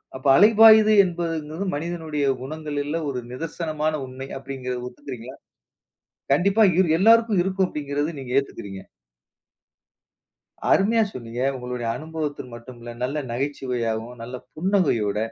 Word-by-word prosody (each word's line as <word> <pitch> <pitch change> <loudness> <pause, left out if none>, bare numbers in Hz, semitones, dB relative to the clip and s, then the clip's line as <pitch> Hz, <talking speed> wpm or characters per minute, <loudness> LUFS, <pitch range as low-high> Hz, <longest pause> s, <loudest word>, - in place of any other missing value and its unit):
அப்ப 130 +2 -4
அலைபாயுது 215 +2 +7
என்பதுங்கிறது, 165 0 -3
மனிதனுடைய 155 -2 -3 0.2
குணங்களில 150 +2 -4
ஒரு 125 -2 -3
நிதர்சனமான 155 +1 -3
உண்மை 130 +1 -8
அப்படின்கிறதை 130 -2 -5
ஒத்துக்கிறீங்களா? 130 -1 -9 1.0
கண்டிப்பா 200 +8 +4
இரு 185 -3 +4
எல்லாருக்கும் 225 -1 +5
இருக்கும், 190 0 0
அப்படிங்கிறத 145 +1 -3
நீங்க 125 -1 -6
ஏத்துக்கிறீங்க. 100 -7 -8 1.9
அருமையா 225 +3 +4
சொன்னீங்க, 120 0 -6
உங்களுடைய 125 -2 -5
அனுபவத்த 155 -3 -5
மட்டும் 120 +1 -11
இல்ல, 120 0 -8
நல்ல 140 +4 -2
நகைச்சுவையாகவும், 120 -3 -3
நல்ல 125 +2 -7 0.2
புன்னகையோட 155 - +1
145 Hz, 105 wpm, -23 LUFS, 125-175 Hz, 1.9 s, அலைபாயுது